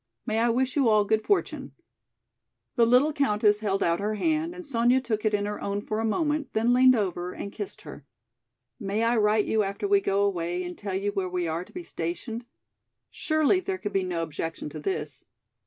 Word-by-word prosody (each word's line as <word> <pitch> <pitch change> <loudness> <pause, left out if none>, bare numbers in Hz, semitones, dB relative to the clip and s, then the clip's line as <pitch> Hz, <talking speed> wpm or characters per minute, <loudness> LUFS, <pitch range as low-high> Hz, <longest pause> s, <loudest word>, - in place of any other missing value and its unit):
May 220 +1 0
I 235 +1 +3
wish 255 +2 0
you 275 -5 +3
all 210 -1 +4
good 220 +1 +1
fortune?" 405 - -1 1.0
The 235 -3 +4
little 255 +6 +4
countess 210 -7 +2
held 200 -2 0
out 170 0 +1
her 210 +2 -1
hand 320 +7 0
and 360 -1 -8
Sonya 245 -1 +3
took 225 -4 -3
it 215 - +2
in 205 0 -1
her 210 0 -4
own 200 0 -2
for 215 +1 -3
a 225 - 0
moment 295 +5 0
and - - -37 0.2
then - - +5
leaned 255 0 +6
over 180 -4 -2
and 200 - -6
kissed 400 - -7
her. - - -10 0.8
"May 205 +1 -1
I 230 +1 +2
write 210 0 +3
you 220 - +1
after 200 - -2
we 400 0 +4
go 200 - +1
away 175 -2 -1
and 180 0 -6
tell 200 -2 -5
you 200 +2 -1
where 195 -2 -2
we 180 -1 -2
are 165 +2 -2
to - - -19
be 360 - -7
stationed? 225 - -5 0.6
Surely 310 +3 +2
there 375 0 -3
could 205 - -5
be 195 - +2
no 175 -2 -2
objection 165 0 -5
to 155 - -8
this. 150 -5 -4
215 Hz, 215 wpm, -26 LUFS, 195-255 Hz, 1.0 s, leaned